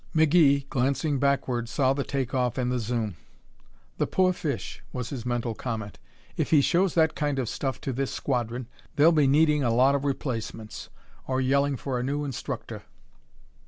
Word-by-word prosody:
McGee, 150 -3 +4
glancing 140 +2 0
backward, 130 -4 0
saw 130 +1 +2
the 140 0 -2
take 135 -3 -3
off 125 -2 0
and 125 -1 0
the 125 - 0
zoom. 110 -5 -2 0.8
"The - - +1
poor 185 -1 +2
fish!" 140 - -4
was 125 -3 -5
his 125 -4 -5
mental 120 -1 -1
comment. 110 -3 -5 0.4
"If - - -1
he 155 - +6
shows 175 +5 +2
that 160 -2 +4
kind 145 -2 -1
of 130 -3 -1
stuff 135 +3 -3
to 135 - -3
this 135 +2 -1
squadron 120 -2 -2 0.3
they'll 155 +3 +6
be 150 -4 +4
needing 150 +1 +4
a 120 - +2
lot 130 +4 +4
of 140 0 0
replacements 115 -6 -4 0.4
or 130 0 0
yelling 140 +1 +2
for 130 -2 -3
a - - -2
new 145 +3 -1
instructor." 135 -4 -5
135 Hz, 175 wpm, -26 LUFS, 125-145 Hz, 0.8 s, he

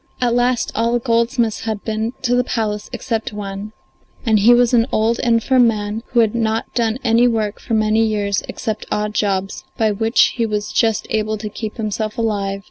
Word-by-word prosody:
At 245 -2 +1
last 245 0 +1
all 230 +1 0
the 240 - +2
goldsmiths 230 -1 0
had 215 -2 -3
been 220 +2 -2
to 245 -1 +1
the 250 0 +3
palace 210 -4 -3
except 225 -2 -3
one, 200 0 -6 0.5
and 220 -2 +3
he 220 +4 +6
was 245 0 +4
an 235 0 +4
old, 225 +2 +1
infirm 240 +1 +3
man 210 0 -2
who 240 - +3
had 220 -2 +1
not 225 -1 -1
done 230 -1 0
any 235 +1 +4
work 220 -3 -1
for 225 - -2
many 215 +1 +2
years 205 -2 0
except 220 -1 -4
odd 210 0 -1
jobs, 195 -2 -1
by 220 -1 +2
which 225 +3 +2
he 230 - +1
was 210 -1 -3
just 225 -2 +1
able 215 0 0
to 210 +1 -5
keep 215 +2 -6
himself 215 -1 -3
alive. 200 -3 -1
220 Hz, 195 wpm, -19 LUFS, 210-235 Hz, 0.5 s, he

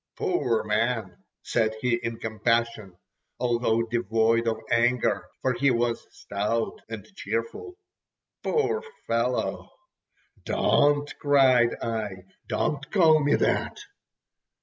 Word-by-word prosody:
"Poor 355 - 0
man!" 110 -2 -1 0.3
said 110 -2 0
he 125 +1 0
in 115 -1 -4
compassion, 110 -3 -1 0.4
although 120 -2 +1
devoid 115 0 +1
of 115 - 0
anger—for 120 +1 +1
he 135 +3 +2
was 120 -1 0
stout 105 +3 -3
and 110 -4 -7
cheerful. 115 - -4 0.6
"Poor 450 -1 0 0.2
fellow!" - - -1 0.7
"Don't!" 145 0 +2
cried 130 -5 +4
I. 105 -5 -4 0.2
"Don't 140 -2 -2
call 160 -6 +5
me 145 +1 +3
that!" - - 0
115 Hz, 100 wpm, -26 LUFS, 110-135 Hz, 0.7 s, call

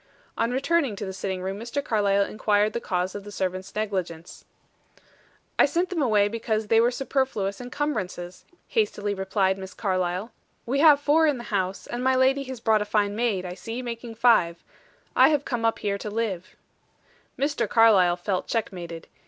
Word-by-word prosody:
On 230 - 0
returning 275 -1 +1
to 205 - -5
the 190 - -5
sitting 190 -1 -4
room 195 +2 -4
Mr. 240 +5 -3
Carlyle 200 -4 +2
inquired 210 0 +1
the - - -1
cause 180 -2 -2
of 205 - -6
the 205 - -10
servants' 185 -1 -4
negligence. 185 -6 -4 1.1
"I - - +7
sent 350 +1 0
them 340 -4 -1
away 210 -6 +3
because 220 -1 -2
they 225 0 +5
were 235 - +4
superfluous 250 -6 -2
encumbrances," 215 -10 -4 0.3
hastily 210 - 0
replied 190 0 0
Miss 190 0 -9
Carlyle. 185 +1 -1 0.3
"We 270 +4 0
have 300 -2 +7
four 305 +2 +3
in 290 -3 +1
the 240 - -7
house, 190 -1 -1
and 245 +1 -4
my 260 0 +3
lady 265 +2 +3
has 260 -2 -7
brought 220 -2 +2
a - - -1
fine 205 -1 0
maid, 215 -5 0
I 180 - -5
see, 230 +6 -6
making 235 -1 -6
five. 200 -8 +3 0.5
I - - +7
have 295 -2 +1
come 240 -3 -2
up 225 - +2
here 200 -1 -2
to 210 - -5
live." 205 -5 -3 0.8
Mr. 280 -6 0
Carlyle 195 -6 +5
felt 185 +1 -2
checkmated. 175 -7 -4
215 Hz, 175 wpm, -25 LUFS, 190-245 Hz, 1.1 s, I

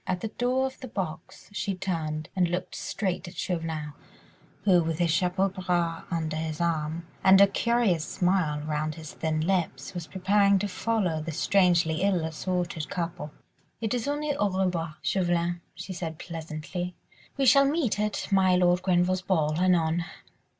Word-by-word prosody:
At 180 -1 -1
the 220 - -3
door 250 +4 0
of 265 0 -5
the 260 - -7
box 180 -8 -6
she 200 -1 -2
turned 160 -5 -3
and 180 -2 +3
looked 180 +1 -3
straight 190 -2 -3
at 175 - -10
Chauvelin, 160 -4 -3 0.7
who, 185 -4 +5
with 165 -1 -2
his 170 -1 +2
chapeau 180 +3 +2
bras 175 -3 -1
under 160 -2 -2
his 160 -1 -3
arm, 165 -1 -1 0.2
and 190 0 +7
a 200 - +9
curious 210 -5 +1
smile 175 -5 0
round 155 0 -2
his 160 -1 -9
thin 155 -1 -1
lips, 165 -8 -1
was 175 -3 -5
preparing 200 +4 +3
to 205 +2 -1
follow 190 -5 0
the 165 +1 -4
strangely 175 -1 +3
ill 190 -4 +2
assorted 170 -1 -3
couple. 170 -3 -4 0.5
"It 225 -1 -1
is 245 +1 -1
only 290 0 -1
au 205 -6 +1
revoir, 180 -4 -1
Chauvelin," 175 -2 0
she 190 - -6
said 165 -3 -5
pleasantly, 165 +2 -5 0.4
"we 275 - +2
shall 275 +3 +7
meet 280 -7 +1
at 210 -1 -1
my 190 -2 +4
Lord 180 0 +3
Grenville's 185 0 +2
ball, 160 -5 +1
anon." 175 -2 +2
180 Hz, 165 wpm, -27 LUFS, 160-195 Hz, 0.7 s, a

